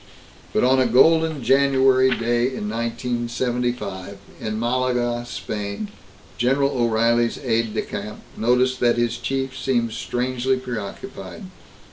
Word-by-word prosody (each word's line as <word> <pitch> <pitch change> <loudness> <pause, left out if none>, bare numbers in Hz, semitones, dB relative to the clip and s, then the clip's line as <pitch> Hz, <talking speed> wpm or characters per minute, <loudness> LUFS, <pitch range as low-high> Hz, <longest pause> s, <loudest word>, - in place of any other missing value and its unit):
But - - +1
on 130 +1 +4
a 130 - +3
golden 160 +3 +4
January 135 0 +4
day 120 0 +1
in 130 -5 -4
1975, 115 -3 -2 0.2
in 110 0 -3
Malaga, 120 0 0
Spain, 105 - -5 0.5
General 135 +3 +2
O'Reilly's 115 -1 +2
aide 115 -3 0
de - - 0
camp 105 +1 -6 0.2
noticed 125 +2 +2
that 120 -1 +3
his 120 0 0
chief 135 +1 -2
seemed 125 -3 0
strangely 125 +3 -1
preoccupied. 120 -6 -7
120 Hz, 115 wpm, -22 LUFS, 115-130 Hz, 0.5 s, on